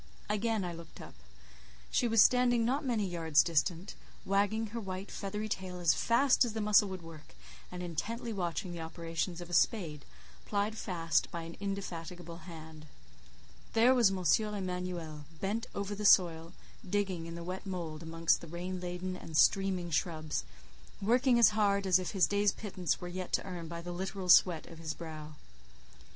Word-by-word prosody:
Again 210 -1 0
I 175 - -4
looked 165 -1 -11
up. - - -10 0.8
She 240 - +2
was 225 -2 +6
standing 245 -2 +4
not 270 +6 0
many 235 -6 0
yards 165 -4 +3
distant, 170 +3 0 0.3
wagging 205 +3 +1
her 235 - -2
white 190 -1 -6
feathery 210 +2 -4
tail 185 -3 -4
as 170 -4 +4
fast 255 - +3
as 235 -3 -2
the 220 - -3
muscle 210 -1 +4
would 185 -2 -6
work, 160 - -12 0.4
and 180 0 -6
intently 225 +8 -4
watching 180 0 -3
the 170 -1 -6
operations 165 +2 -4
of 175 - -8
a - - -6
spade, 165 -6 +1 0.4
plied 205 +1 -1
fast 165 -7 0
by 170 -1 -5
an 165 +1 -8
indefatigable 175 -4 -5
hand. 160 -1 -10 0.9
There 235 +3 +6
was 240 -6 +5
M. 185 -2 -3 0.3
Emanuel, 180 -5 -4
bent 220 +5 -2
over 200 0 -3
the 210 +1 -5
soil, 170 -4 +4 0.4
digging 190 -4 -1
in 165 - -7
the 170 - -6
wet 185 +3 -6
mould 170 -4 -5
amongst 165 0 +1
the 170 - -9
rain 180 +3 -5
laden 180 +1 -4
and 160 -3 -5
streaming 190 -3 +3
shrubs, 155 - -1 0.6
working 245 +4 +3
as 235 -3 +7
hard 200 -2 +2
as 185 -1 +5
if 185 - -3
his 190 -5 +3
day's 205 +5 +2
pittance 185 -6 -2
were 180 - -6
yet 180 0 -5
to - - +2
earn 175 -3 -6
by 170 +1 -6
the 175 - -5
literal 190 +1 -4
sweat 175 -2 +6
of 165 -1 -12
his 155 -1 -4
brow. 155 -2 -8
185 Hz, 175 wpm, -32 LUFS, 165-205 Hz, 0.9 s, as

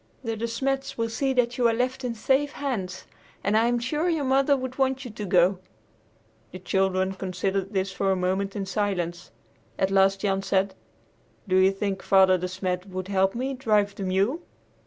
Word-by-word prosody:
The 225 -2 -2
De 225 +2 -3
Smets 270 +4 -2
will 230 0 -1
see 265 +4 0
that 245 -1 +1
you 240 - +5
are 230 - +2
left 255 +2 -1
in 240 -2 -2
safe 275 +6 +1
hands, 210 -11 -4 0.4
and 205 - +1
I'm 235 +2 +3
sure 300 +8 -1
your 320 -4 0
mother 275 +2 +3
would 260 0 -6
want 265 0 +1
you 245 - -6
to 210 -1 -6
go." 180 0 +3 0.9
The 185 - -7
children 190 0 0
considered 190 +1 -2
this 190 0 0
for 195 0 0
a - - +2
moment 190 +2 -1
in 200 -2 -2
silence. 190 -4 -2 0.5
At 190 0 +1
last 195 0 +3
Jan 195 -2 0
said, 195 0 0 0.7
"Do 185 - +1
you 190 +1 +5
think 195 -1 -3
Father 190 -1 +5
De 180 - -2
Smet 185 0 -3
would 185 0 -6
let 195 0 +2
me 250 +2 -2
help 265 -2 -5
drive 210 -4 +2
the 200 - -9
mule?" 195 - 0
200 Hz, 195 wpm, -26 LUFS, 190-245 Hz, 0.9 s, you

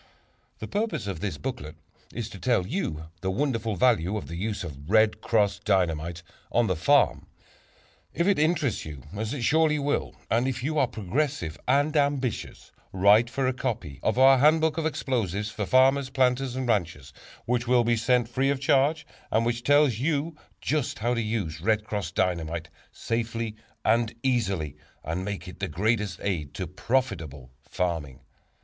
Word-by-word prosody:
The - - -7
purpose 200 - -2
of 95 -5 -4
this 90 -5 -3
booklet 75 +1 -5 0.4
is 120 -3 -4
to 95 - -10
tell 120 -6 +1
you 90 - -3 0.2
the 95 - -1
wonderful 115 -1 -1
value 105 -2 +2
of 105 - -6
the 85 - -5
use 100 +3 -3
of 75 -2 -9
"Red 110 0 +3
Cross" 105 -4 +1
Dynamite 85 -4 0 0.3
on 120 0 +3
the 95 -4 0
farm. 80 - +3 0.8
If 170 - 0
it 200 -4 +3
interests 155 -4 +1
you, 75 -4 -9
as 110 +2 -3
it 140 -4 -3
surely 155 +3 +3
will, 145 0 -1
and 120 +3 +1
if 130 -2 -3
you 155 +2 0
are 135 - +3
progressive 110 - -2
and 145 +4 +2
ambitious, 140 -5 -1 0.2
write 100 +5 +5
for 135 +2 -1
a 130 - +1
copy 115 - -4
of - - 0
our 135 0 +7
"Handbook 155 +2 +4
of 160 - +1
Explosives 105 - -2
for 105 -2 -4
Farmers, 130 +1 +4
Planters 130 -1 +1
and 130 -1 -2
Ranchers," 80 - -1 0.3
which 120 0 0
will 125 -1 +4
be 120 0 +2
sent 120 +1 +2
free 130 +3 0
of 140 -1 0
charge 140 +3 +2 0.2
and 115 +1 +2
which 120 0 -1
tells 145 +1 +4 0.7
just 150 -4 -1
how 120 +3 0
to 115 - 0
use 105 -8 -3
"Red 110 -1 +1
Cross" 100 -5 -4
Dynamite 85 -3 -1 0.2
safely 115 -1 -3 0.3
and 115 +1 +2
easily, 100 - 0 0.3
and 85 +3 -3
make 100 -1 -5
it 90 +1 -10
the 95 - -1
greatest 105 +3 0
aid 85 -8 -2
to - - -3
profitable 80 - -2
farming. 80 -7 -3
115 Hz, 170 wpm, -26 LUFS, 90-130 Hz, 0.8 s, our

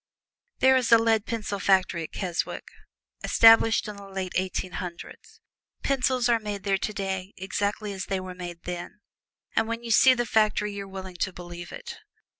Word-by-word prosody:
There 265 0 +6
is 250 -3 +1
a 230 - +9
lead 225 -2 +2
pencil 215 -3 -3
factory 185 -3 +2
at 160 - -6
Keswick, 180 -4 -3 0.5
established 225 0 +6
in 210 -1 -7
the 200 -1 -11
year 185 - -4
Eighteen 185 0 -2
Hundred. 175 -2 -7 0.7
Pencils 255 -2 +1
are 235 -1 +3
made 205 -3 -5
there 195 -1 +1
today 195 -2 -4
exactly 200 +2 -2
as 190 -1 -5
they 195 -1 -1
were 185 0 -7
made 175 -1 -8
then, 180 +4 -7 0.5
and 225 - +2
when 230 +1 -4
you 230 - -4
see 255 +4 +6
the 240 -1 -1
factory 215 -2 +1
you 200 -1 -5
are - - -13
willing 190 -2 -8
to 190 - -1
believe 175 -1 -9
it. - - -8
200 Hz, 180 wpm, -26 LUFS, 185-225 Hz, 0.7 s, a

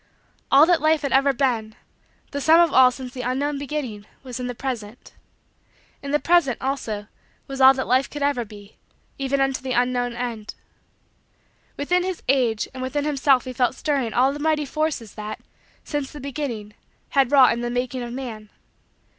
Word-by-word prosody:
All 285 +3 +8
that 345 0 +3
Life 310 0 +2
had 280 - -1
ever 275 +1 +4
been 235 -5 -1 0.6
the 285 - -3
sum 320 +4 +6
of 340 -3 +4
all 255 -1 +7
since 255 0 -8
the 255 - -5
unknown 275 +3 -1
beginning 265 -8 -5 0.2
was 255 -1 -7
in 250 - -3
the 245 - -5
present. 235 -4 -6 0.9
In 280 - -6
the 295 - +3
present, 315 -6 +2
also, 235 -6 -3 0.4
was 270 0 -5
all 265 +1 +8
that 260 - -2
Life 255 +2 +2
could 290 -1 -5
ever 280 -4 +1
be, 205 -1 -14 0.4
even 275 0 0
unto 270 -1 0
the 260 -1 -3
unknown 245 0 0
end. 235 -3 -5 1.2
Within 355 +6 +1
his 370 -1 -4
age 245 -5 +1
and 260 - -7
within 285 +3 -2
himself 275 -3 +2
he 255 - -5
felt 250 +1 +1
stirring 275 -7 -1
all 260 +4 +3
the 290 - -7
mighty 305 0 +1
forces 300 -6 -2
that, 215 0 -6 0.4
since 290 -3 -4
the 295 - -9
beginning, 255 -7 -5 0.4
had 275 -2 +2
wrought 270 -3 +6
in 235 - -4
the 240 - -2
making 245 +1 -2
of 240 -1 -5
man. 235 -5 -7
260 Hz, 180 wpm, -23 LUFS, 240-285 Hz, 1.2 s, All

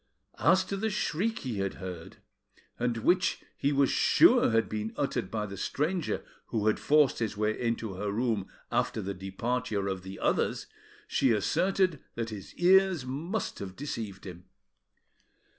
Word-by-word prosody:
As - - +4
to 195 - -3
the 220 +3 0
shriek 210 +2 -1
he 115 -6 -2
had 100 0 -2
heard, 90 -3 -8 0.6
and 120 -1 0
which 180 +10 +2
he 140 - 0
was 140 -1 +3
sure - - +5
had 115 0 +2
been 110 +1 -4
uttered 130 -4 -1
by 110 -1 -2
the 100 -1 -7
stranger 155 - -1 0.2
who 110 -3 -1
had 110 - +2
forced 150 -2 +3
his 110 -3 -2
way 110 +1 0
into 115 -3 -1
her 100 +2 -3
room 110 -3 0 0.2
after - - 0
the 100 +1 -3
departure 100 +3 -2
of 95 -1 -2
the 95 +1 -8
others, - - 0 0.4
she 135 -3 +2
asserted 185 - +1
that 115 -1 -3
his 100 -3 -9
ears 185 -4 +4
must 165 +11 -3
have 95 -1 -6
deceived 110 -9 -5
him. 90 -1 -9
115 Hz, 160 wpm, -29 LUFS, 100-150 Hz, 0.6 s, sure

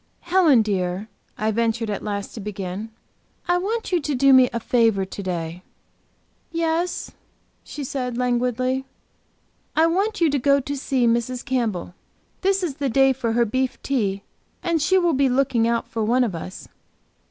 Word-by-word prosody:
"Helen, 335 -9 +4
dear," 190 0 -2 0.3
I 215 +1 0
ventured 225 0 0
at 200 - -3
last 200 -1 -4
to - - -7
begin 195 0 -5 0.6
"I 350 0 +3
want 440 +4 -2
you 355 - +3
to 290 -1 -2
do 275 +1 +5
me 255 -1 +7
a 235 - -2
favor 225 -4 +2
to 195 - -7
day." 175 -2 -4 0.9
"Yes," 335 +1 -1 0.5
she 295 - -7
said, 250 -2 -3
languidly. 250 +1 0 0.9
"I 320 - +5
want 390 +6 0
you 330 -4 +3
to 285 - +1
go 280 +2 +4
to 280 +2 -4
see 265 -2 0
Mrs. 235 +2 0
Campbell. 230 -10 -1 0.5
This 390 0 +1
is 300 -6 -3
the 275 -1 -1
day 270 +2 +4
for 235 -3 -2
her 235 +1 +3
beef 260 +3 -1
tea, 200 -7 -1 0.4
and 335 -3 +1
she 375 +6 +3
will 345 -3 +3
be 270 -1 +3
looking 250 -3 +2
out 235 0 0
for 225 - -3
one 245 +4 +3
of 225 -6 -1
us. 175 +3 -7
250 Hz, 170 wpm, -23 LUFS, 220-285 Hz, 0.9 s, me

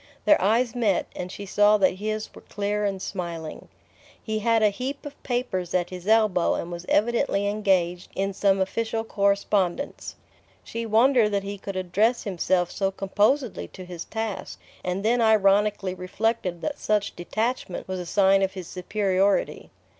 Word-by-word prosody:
Their 305 - +5
eyes 225 +4 +2
met, 220 -6 +1
and 180 0 -5
she 200 - -7
saw 205 +2 +4
that 190 -2 +3
his 215 +1 -4
were - - -13
clear 205 0 -2
and 195 -1 -1
smiling. 170 -4 -6 0.5
He 220 -1 -3
had 225 0 +2
a 210 - +6
heap 265 +7 -5
of 290 0 -9
papers 240 -9 -2
at 175 0 0
his 180 0 -8
elbow 215 -5 +3
and 170 - -4
was 175 +1 -7
evidently 230 -2 +2
engaged 190 -4 0
in 195 +1 -1
some 195 0 +2
official 225 +4 -1
correspondence. 200 +1 0 0.5
She 230 0 -5
wondered 230 +1 +4
that 200 -1 0
he 200 0 -6
could 195 0 -6
address 200 +6 +1
himself 180 -2 0
so 195 -1 0
composedly 210 +7 0
to 185 - -11
his 175 -2 -7
task, 220 -2 -5 0.2
and 180 +3 -2
then 240 +2 +3
ironically 205 -3 +3
reflected 185 0 -2
that 295 - -3
such 210 -1 0
detachment 215 +2 -3
was 185 0 -3
a 180 - -5
sign 195 +1 +4
of 190 0 0
his 185 -2 -7
superiority. 195 +2 0
200 Hz, 160 wpm, -25 LUFS, 185-220 Hz, 0.5 s, a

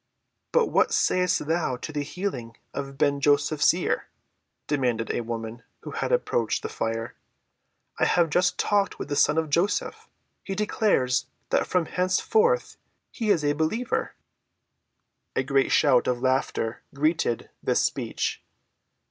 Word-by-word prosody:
"But 475 -1 +4
what - - +3
sayest 180 -3 +2
thou 160 -4 0
to 155 - -7
the 150 -1 -2
healing 140 - -5 0.2
of 135 -1 -5
Ben‐Joseph's 145 +1 +3
ear?" - - -2 0.6
demanded 125 -6 0
a - - -1
woman 115 0 -5 0.2
who - - -8
had - - -2
approached 120 - 0
the - - -3
fire. 115 +1 -3 0.9
"I - - +4
have 170 -3 +2
just 180 +2 +2
talked 205 -1 +1
with - - -6
the 145 - -1
son 150 +2 +3
of 160 -2 0
Joseph. 180 +6 0 0.4
He 195 - -4
declares 205 - +1 0.2
that - - +2
from 180 -2 +1
henceforth 440 - +1 0.3
he 225 -3 -3
is 175 -7 +3
a 145 - +3
believer." 160 +11 -1 1.2
A 130 - +1
great 135 0 +1
shout 130 -5 +4
of 125 -1 0
laughter 130 -3 -1
greeted 155 -5 0
this - - +1
speech. - - -2
150 Hz, 140 wpm, -26 LUFS, 125-180 Hz, 1.2 s, But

